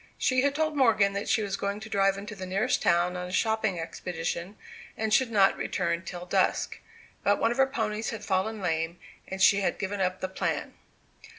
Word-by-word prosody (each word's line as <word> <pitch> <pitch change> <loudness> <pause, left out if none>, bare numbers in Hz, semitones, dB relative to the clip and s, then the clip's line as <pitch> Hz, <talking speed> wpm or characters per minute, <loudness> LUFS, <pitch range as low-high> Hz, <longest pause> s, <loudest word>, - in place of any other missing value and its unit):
She 255 -1 +2
had 280 +1 +1
told 310 0 0
Morgan 220 -7 +4
that 200 +1 -3
she 220 0 +2
was 200 -1 -2
going 200 +1 -3
to 220 - -7
drive 195 -2 +2
into 205 +2 -7
the 185 -1 -6
nearest 195 +3 +1
town 175 +1 +2
on 180 0 -4
a - - -8
shopping 220 -2 +1
expedition, 170 +3 -4 0.4
and 220 -1 -1
should 260 0 +4
not 200 -3 +4
return 170 -2 -1
till 180 0 -7
dusk. - - 0 0.4
But 205 0 +3
one 230 - +2
of 240 - -3
her 270 0 +5
ponies 220 -4 -2
had 215 -2 -6
fallen 205 +3 0
lame, 165 -1 -1 0.3
and 190 - -6
she 200 +1 +6
had - - 0
given 200 0 -3
up 185 0 0
the 185 - -2
plan. 185 - -2
200 Hz, 205 wpm, -28 LUFS, 185-220 Hz, 0.4 s, she